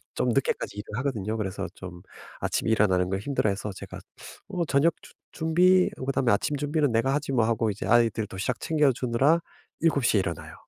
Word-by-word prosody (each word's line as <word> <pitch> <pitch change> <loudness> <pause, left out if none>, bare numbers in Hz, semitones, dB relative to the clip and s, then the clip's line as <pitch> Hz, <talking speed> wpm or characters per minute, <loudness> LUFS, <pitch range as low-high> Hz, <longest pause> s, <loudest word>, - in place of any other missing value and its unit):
좀 125 - 0
늦게까지 120 -4 -1
일을 105 +3 -5
하거든요. 110 -6 -2
그래서 95 -3 -3
좀 90 -2 -9 0.4
아침에 - - -1
일어나는 95 -4 +2
걸 95 0 -1
힘들어해서 105 -5 -1
제가 - - -9 0.5
"어 180 -4 -1
저녁 150 +4 +3
준 - - -16 0.2
준비 180 +3 +3 0.2
그다음에 130 -3 +1
아침 145 +8 0
준비는 145 -1 0
내가 115 +4 +1
하지 145 -1 -2
뭐." 115 -3 +3
하고 115 -1 +1
이제 100 - -6
아이들 115 -3 +3
도시락 100 +6 -3
챙겨주느라 140 0 +2 0.4
7:00 140 -9 +2
에 - - +4
일어나요. 85 -4 -5
120 Hz, 395 characters per minute, -26 LUFS, 105-145 Hz, 0.5 s, 에